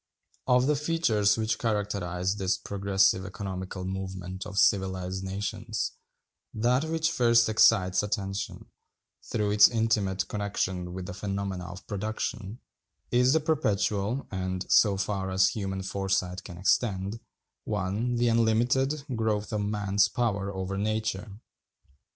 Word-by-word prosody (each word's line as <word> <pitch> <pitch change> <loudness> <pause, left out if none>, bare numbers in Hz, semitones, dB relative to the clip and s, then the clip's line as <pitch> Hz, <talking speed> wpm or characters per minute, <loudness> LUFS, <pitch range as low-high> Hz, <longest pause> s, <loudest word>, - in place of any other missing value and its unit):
Of 125 0 +4
the 150 +2 +2
features 135 -10 +2
which 110 0 -1
characterize 100 -4 -1
this 95 -1 0
progressive 95 0 +1
economical 95 0 -5
movement 95 -1 -5
of 95 - -8
civilized 95 -1 +1
nations, 105 +3 -3 0.6
that 125 +6 +2
which 160 0 0
first 115 -4 +4
excites 100 -4 +4
attention, 100 -1 -3 0.6
through 105 -2 -1
its 105 0 +8
intimate 105 -5 0
connection 95 -4 -2
with 95 -1 -5
the 100 - -6
phenomena 100 -1 -4
of 90 +2 -9
Production, 105 +1 -4 0.5
is 125 +2 +4
the 160 - +4
perpetual, 110 -5 0
and, 95 -1 -3
so 100 -3 +5
far 95 -1 -2
as 95 0 +4
human 95 -2 -4
foresight 95 -1 -1
can 90 -3 -9
extend 100 +2 0 0.5
(1), 105 +7 -1
the 120 0 +2
unlimited, 120 +5 +2
growth 110 -1 -1
of 105 - 0
man's 105 0 +1
power 100 -4 -1
over 95 0 -4
nature. 105 -1 -2
100 Hz, 125 wpm, -28 LUFS, 95-110 Hz, 0.6 s, its